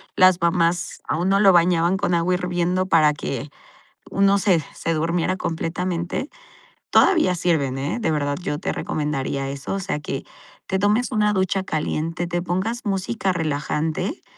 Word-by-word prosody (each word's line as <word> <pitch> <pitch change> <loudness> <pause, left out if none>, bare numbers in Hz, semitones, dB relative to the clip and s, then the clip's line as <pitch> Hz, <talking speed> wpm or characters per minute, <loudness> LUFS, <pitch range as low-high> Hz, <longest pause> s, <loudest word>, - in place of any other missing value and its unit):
las 185 -2 +5
mamás 170 0 +1
a - - 0
uno 190 +4 +2
lo 200 -2 +7
bañaban 175 +1 +3
con 180 - 0
agua 170 +2 +2
hirviendo 180 0 0
para 155 -4 +4
que 140 -1 -5 0.6
uno 200 0 +3
se 185 -5 +2
se 165 - -2
durmiera 170 +3 0
completamente. 170 - -3 0.6
Todavía 330 - +4
sirven, 160 -7 0
eh, 140 - -2
de 220 - 0
verdad 145 -1 -1
yo 150 -4 -3
te - - -2
recomendaría 140 -2 -2
eso, 140 +7 -5
o 195 - -2
sea, 185 -5 -2
que 135 -2 -4 0.5
te 190 - 0
tomes 210 +6 +2
una 210 -1 +2
ducha 190 0 0
caliente, 165 +1 -2
te 175 0 -1
pongas 190 +7 -2
música 195 0 -1
relajante, 160 - -2
175 Hz, 155 wpm, -22 LUFS, 155-190 Hz, 0.6 s, lo